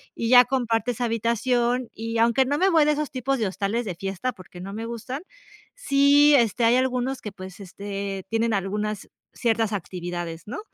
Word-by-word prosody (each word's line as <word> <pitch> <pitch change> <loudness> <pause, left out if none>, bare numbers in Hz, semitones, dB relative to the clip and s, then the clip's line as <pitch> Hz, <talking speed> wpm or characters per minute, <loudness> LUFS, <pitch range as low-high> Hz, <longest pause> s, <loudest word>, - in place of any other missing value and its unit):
Y 230 - -2
ya 250 0 +9
compartes 240 -2 -1
habitación, 240 +1 0
y 230 +1 -4
aunque 235 +3 +3
no 285 +3 0
me 380 +4 +3
voy 325 -4 +5
de 300 - +3
esos 300 0 -3
tipos 265 +1 -1
de 220 - 0
hostales 200 +5 -2
de 185 -4 -4
fiesta, 195 +7 -3
porque 185 -3 -13
no 195 +2 -7
me 225 +2 -5
gustan, 235 +6 -6 0.5
sí, 290 - +5
este, 235 -2 +2
hay 230 +2 +5
algunos 255 0 -1
que, 210 - -6
pues, 190 -1 -10
este, 195 0 -6
tienen 225 0 0
algunas, 210 +1 -3 0.2
ciertas 225 -2 0
actividades, 175 -3 -5
¿no? 235 - -5
230 Hz, 180 wpm, -24 LUFS, 200-255 Hz, 0.5 s, ya